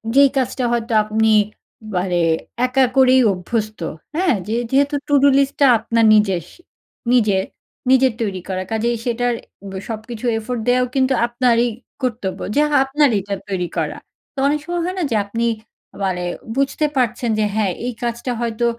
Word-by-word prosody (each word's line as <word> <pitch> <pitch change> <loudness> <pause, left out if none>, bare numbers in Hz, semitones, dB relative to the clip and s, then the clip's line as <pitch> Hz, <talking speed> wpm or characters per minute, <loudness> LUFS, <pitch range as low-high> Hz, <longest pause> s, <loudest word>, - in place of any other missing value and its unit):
যেই 280 0 +7
কাজটা 260 0 -1
হয়তো 235 0 -1
আপনি, 220 +1 +1 0.7
মানে 180 -1 0 0.5
একা 260 +1 +3
করেই 260 0 +6
অভ্যস্ত, 215 +4 -3 0.4
হ্যাঁ? 345 -5 +2
যে 220 - -1 0.2
যেহেতু 280 +2 +2
টুডু 285 -1 +4
লিস্টটা 280 +1 +2
আপনার 230 +1 +1
নিজেস 195 -6 +2 0.7
নিজের 210 -6 +3 0.5
নিজের 260 -1 +4
তৈরি 195 -4 -2
করা, 185 0 -2
কাজেই 230 +2 0
সেইটার 245 0 0 0.4
ব - - -9 0.2
সবকিছু 220 +1 -6
effort 235 +2 -4
দেওয়াও 250 0 +3
কিন্তু 265 0 +2
আপনারই 240 0 +2 0.3
কর্তব্য, 215 -7 -2 0.2
যা 295 - +4 0.2
আপনারইতো 265 -8 +1 0.2
তৈরি 180 -3 -1
করা। - - -2 0.4
তো - - -59
অনেক 295 +1 +1
সময় 345 0 -2
হয় 365 +1 -3
না - - 0
যে, - - +2
আপনি 230 +3 -2 0.6
মানে 180 -2 -1 0.3
বুঝতে 275 +2 +1
পারছেন 240 -1 0
যে, 215 - +2
"হ্যাঁ, 210 -3 +1
এই 250 - -2
কাজটা 235 +1 -2
হয়তো 235 0 -1
235 Hz, 150 wpm, -19 LUFS, 215-265 Hz, 0.7 s, যেই